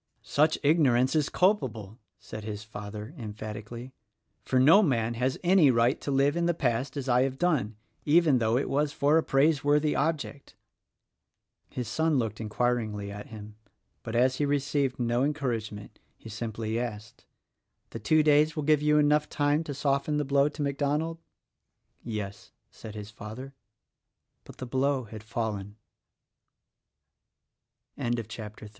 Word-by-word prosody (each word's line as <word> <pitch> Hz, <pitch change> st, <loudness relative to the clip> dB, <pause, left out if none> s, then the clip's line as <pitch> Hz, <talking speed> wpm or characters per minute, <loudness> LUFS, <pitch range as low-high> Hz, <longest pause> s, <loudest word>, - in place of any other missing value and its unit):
_ -, -, -28 dB
"Such 155 Hz, +2 st, +2 dB
ignorance 135 Hz, -4 st, +3 dB
is 150 Hz, -2 st, +2 dB
culpable!" 120 Hz, -, 0 dB, 0.2 s
said 110 Hz, -, -9 dB
his 105 Hz, 0 st, -6 dB
father, 105 Hz, +3 st, -8 dB
emphat 110 Hz, -1 st, -6 dB
ically, 120 Hz, +4 st, -9 dB, 0.5 s
"for 130 Hz, -, +1 dB
no 160 Hz, +11 st, +7 dB
man 120 Hz, -, +1 dB
has 125 Hz, +3 st, -1 dB
any 175 Hz, -4 st, +5 dB
right 120 Hz, +1 st, +2 dB
to -, -, -5 dB
live 140 Hz, +2 st, +2 dB
in 170 Hz, 0 st, +1 dB
the 175 Hz, -, +1 dB
past 130 Hz, +1 st, -1 dB
as 140 Hz, -1 st, -4 dB
I 125 Hz, 0 st, +4 dB
have 135 Hz, 0 st, -1 dB
done— 135 Hz, -11 st, 0 dB, 0.3 s
even 155 Hz, -3 st, +4 dB
though 115 Hz, +1 st, +2 dB
it 135 Hz, -, -1 dB
was 145 Hz, +1 st, 0 dB
for 150 Hz, +2 st, +3 dB
a -, -, -1 dB
praiseworthy 145 Hz, +1 st, +2 dB
object." 145 Hz, -2 st, -2 dB, 1.1 s
His 125 Hz, -2 st, -5 dB
son 160 Hz, +6 st, +1 dB
looked 110 Hz, -3 st, -2 dB
inquiringly 110 Hz, -2 st, -1 dB
at 105 Hz, 0 st, -8 dB
him; 105 Hz, -1 st, -11 dB, 0.4 s
but, 115 Hz, -1 st, -6 dB
as 130 Hz, +2 st, +3 dB
he 145 Hz, -, +1 dB
received 140 Hz, -2 st, 0 dB
no 120 Hz, +1 st, +1 dB
encouragement, 115 Hz, -8 st, -3 dB, 0.2 s
he 115 Hz, -, -12 dB
simply 110 Hz, +1 st, -3 dB
asked, 110 Hz, -3 st, -7 dB, 0.7 s
"The 115 Hz, -, -6 dB
two 155 Hz, +8 st, +3 dB
days 150 Hz, +1 st, +4 dB
will 155 Hz, -, -2 dB
give 150 Hz, 0 st, +3 dB
you 150 Hz, 0 st, +3 dB
time 150 Hz, -, +5 dB
enough 150 Hz, 0 st, +2 dB, 0.4 s
to 145 Hz, -, -4 dB
soften 140 Hz, +2 st, 0 dB
the 150 Hz, -, 0 dB
blow 140 Hz, +1 st, +3 dB
to 150 Hz, 0 st, -5 dB
MacDonald?" 145 Hz, +4 st, -1 dB, 0.8 s
"Yes," 105 Hz, -3 st, -6 dB, 0.2 s
said 110 Hz, -1 st, -10 dB
his 105 Hz, 0 st, -8 dB
father. 110 Hz, +6 st, -9 dB, 0.9 s
But -, -, -13 dB
the 130 Hz, -, -6 dB
blozo 130 Hz, -1 st, 0 dB
had 110 Hz, -1 st, -8 dB
fallen. 110 Hz, -3 st, -4 dB, 2.5 s
CHAPTER 110 Hz, -1 st, -9 dB
IV. -, -, -10 dB
130 Hz, 150 wpm, -28 LUFS, 110-150 Hz, 2.5 s, no